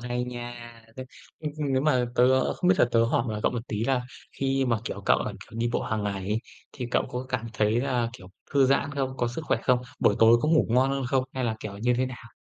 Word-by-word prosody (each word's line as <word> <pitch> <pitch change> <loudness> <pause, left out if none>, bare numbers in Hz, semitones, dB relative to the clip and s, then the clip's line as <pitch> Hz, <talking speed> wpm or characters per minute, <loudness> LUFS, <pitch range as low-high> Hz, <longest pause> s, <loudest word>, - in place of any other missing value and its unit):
hay 125 0 -2
nha. 120 -1 -6 0.4
Nếu, 130 0 -7 0.3
ơ, 155 - -2 0.2
nếu 130 +1 +2
mà 130 -5 +3
tớ 130 +1 +4
không 180 - 0
biết 185 - +6
thật 120 - +4
tớ 115 0 +4
hỏi 115 - +1
mà 105 -1 -3
cậu - - +2
một 120 0 -5
tí 110 +1 -2
là 130 -1 +1 0.3
khi 135 0 0
mà, 115 -3 +1
kiểu, - - -5
cậu - - +5
là, - - -3
kiểu, 115 - -11
đi 120 +1 +1
bộ - - 0
hàng 110 -3 -2
ngày 100 -1 -1
ấy 105 +2 +1 0.3
thì 125 - -5
cậu - - +1
có 125 +1 -5
cảm 120 -3 -2
thấy 110 +2 +2
là, 125 -3 0
kiểu, 120 -5 -12 0.3
thư 135 -2 +5
giãn 140 +1 +2
không, 130 -2 -2
có 120 -1 0
sức 140 +7 -5
khỏe - - +1
không, 125 -1 +3 0.2
buổi - - +4
tối 115 +1 +7
có 155 - +1
ngủ 160 -1 +4
ngon 130 +4 +3
hơn 135 -1 -1
không 130 0 +1
hay 130 - -1
là, 110 -2 -1
kiểu, 100 -2 -7
như 120 +3 +2
thế 130 +1 +1
nào? 120 -2 -10
125 Hz, 265 wpm, -26 LUFS, 115-130 Hz, 0.4 s, tối